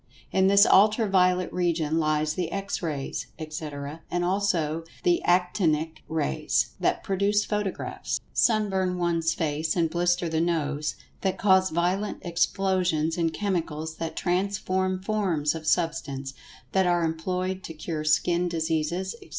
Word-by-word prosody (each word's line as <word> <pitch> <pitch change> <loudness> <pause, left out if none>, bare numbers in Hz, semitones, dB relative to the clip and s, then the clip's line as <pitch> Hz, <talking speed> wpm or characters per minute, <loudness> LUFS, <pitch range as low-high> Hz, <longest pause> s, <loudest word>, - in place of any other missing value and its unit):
In 190 0 +3
this 200 +1 +7
Ultra 215 +3 +5
violet 185 -2 +2
region 165 -3 0
lies 155 -1 +1
the 175 -1 -3
X 195 0 -3
Rays, 150 -5 -3
etc., 155 -1 -6
and 175 0 0
also 175 -5 0 0.2
the 350 -1 +3
"Actinic 170 -3 +1
Rays," 155 - 0
that - - 0
produce 200 +2 +1
photographs, 210 -3 -3
sunburn 195 -5 +2
one's 165 -2 0
face 155 0 -1
and 165 -3 +1
blister 175 0 +1
the 160 0 0
nose—that 160 +3 -2
cause 190 -1 +4
violent 180 +5 0
explosions 175 -2 +1
in 165 -2 +1
chemicals—that 160 -4 -3
transform 185 0 -1
forms 185 -9 0
of 160 -1 -7
Substance—that 165 +2 -1
are 175 -1 +2
employed 180 +3 -2
to 165 - -8
cure 155 0 -4
skin 170 +3 +2
diseases, 165 +2 -1
etc. - - -15
175 Hz, 125 wpm, -26 LUFS, 160-190 Hz, 0.2 s, this